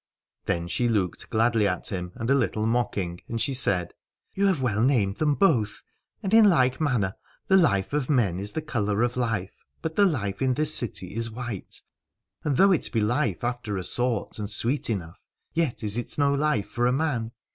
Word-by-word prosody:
Then 85 0 -1
she 120 +7 0
looked 100 -7 -1
gladly 115 -1 +2
at 90 -1 -2
him 90 -2 -4
and 115 - -4
a - - +6
little 110 -5 0
mock 120 0 0
ing, 90 -2 -3
and 115 - -3
she 135 - 0
said: 90 -9 +1 0.4
You 200 +1 +2
have 185 -6 +1
well 115 -5 0
named 115 -6 +2
them 150 -2 +1
both. 120 - +1 0.4
And 195 - -2
in 220 -2 +8
like 130 -5 +2
manner 120 -11 +1 0.4
the 190 - +5
life 100 - +2
of 145 -3 -1
men 110 - +2
is 100 +1 -3
of - - -15
the 160 - -1
colour 110 -7 0
of 120 0 0
life, 115 -6 -2 0.3
but 160 -1 -3
the 200 -1 +5
life 100 - -2
in 130 -1 +2
this 155 +2 +3
city 95 -6 0
is 115 +1 -2
white, 115 -3 -6 0.6
and 145 -4 0
though 195 +1 +6
it 180 - +1
be 115 - +1
life 105 -3 0
after 120 -4 -2
a 95 - -3
sort, 120 0 -1
and 105 -1 -4
sweet 120 +7 -1
enough, 90 -5 -4 0.3
yet 160 -9 -1
is 105 +2 +1
it 120 - -5
no 140 -1 +3
life 140 -7 0
for 120 0 0
a - - +2
man. 130 -5 -1
120 Hz, 210 wpm, -26 LUFS, 105-140 Hz, 0.6 s, in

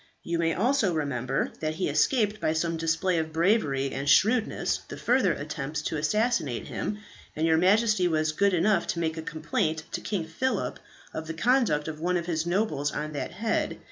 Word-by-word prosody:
You 170 0 -2
may 165 -1 +1
also 225 -4 +2
remember 135 -3 -1
that 155 0 -2
he 180 - -1
escaped 215 -5 +2
by 155 - +1
some 165 +1 0
display 165 +2 +1
of 160 0 -3
bravery 160 - +1
and 140 +1 -2
shrewdness 215 - +3
the - - -8
further - - +2
attempts - - -4
to - - -2
assassinate 215 - 0
him, 210 - -3 0.4
and 155 - 0
your 160 -1 +4
Majesty 200 +1 +3
was 155 -2 +1
good 200 +4 +2
enough 195 +5 +2
to 170 - -2
make 160 -1 -1
a - - -3
complaint 155 0 -2
to - - -3
King 190 -6 -2
Phillip 165 +12 -2 0.3
of 160 0 -5
the 160 - -5
conduct 220 - +2
of 155 -1 -5
one 180 +2 +1
of 170 - -3
his 165 -1 -1
nobles 175 -7 0
on 150 +1 -4
that 145 - -3
head. 220 0 -1
165 Hz, 190 wpm, -27 LUFS, 155-205 Hz, 0.4 s, your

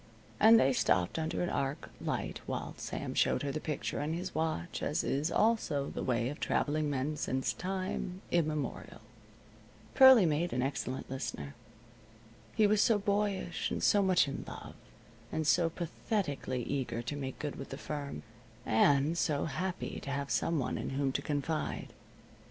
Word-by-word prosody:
And 225 +1 +8
they 135 0 +4
stopped 90 - +1
under 160 +2 -1
an 175 - -1
arc 140 +2 -2
light - - -3
while - - -3
Sam - - -4
showed - - +2
her 140 - -1
the 155 - -3
picture 150 -2 -3
in 155 +2 -1
his 175 - -4
watch, 160 - -2
as - - 0
is 145 +4 0
also 190 -11 +1
the - - -4
way 120 -1 0
of 145 - -7
traveling 150 0 0
men 145 +2 -1
since 130 -2 -1
time 185 0 -4
immemorial. 155 -4 -1 0.9
Pearlie 260 -7 +9
made 160 +2 0
an 125 0 0
excellent 130 -1 -3
listener. 75 - -5 1.0
He 215 - +5
was 210 0 +4
so 225 - +4
boyish, 200 -3 -1
and - - -3
so 205 - +5
much 185 -5 +4
in 140 - -4
love, - - -8 0.6
and 160 -1 -1
so 165 +3 +4
pathetically 165 - -2
eager 125 -2 -2
to 125 +4 -4
make 135 -2 -5
good 145 -2 -4
with 135 - -7
the 135 - -6
firm, 145 -1 -5 0.4
and 140 +7 +3
so 150 -4 0
happy 185 +5 -3
to - - -8
have 140 0 -2
some 165 - +1
one 130 - -1
in - - -3
whom 140 -1 +1
to 140 - -1
confide. 150 +2 -2
150 Hz, 165 wpm, -32 LUFS, 135-175 Hz, 1.0 s, Pearlie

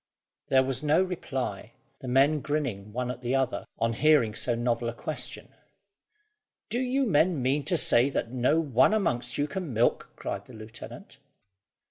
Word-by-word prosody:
There 130 0 +4
was 130 0 -1
no 155 +4 +3
reply, 130 - -4 0.3
the 130 - -8
men 135 +4 +3
grinning 130 -9 -3
one 125 +2 -2
at 125 0 -9
the 125 +1 -1
other, 135 -2 -1
on 115 0 0
hearing 145 -4 +3
so 120 +2 0
novel 120 0 -1
a 120 - -7
question. - - -4 1.2
"Do 240 - 0
you 260 +2 +1
men 170 - +2
mean 135 +3 0
to 180 - +1
say 130 -2 +4
that 120 -4 -3
not 130 +4 +2
one 150 - +3
amongst 170 - -1
you 145 - 0
can 175 -5 -5
milk?" 115 +2 +1
cried - - -5
the 130 - -13
lieutenant. 115 - -11
130 Hz, 165 wpm, -27 LUFS, 120-155 Hz, 1.2 s, There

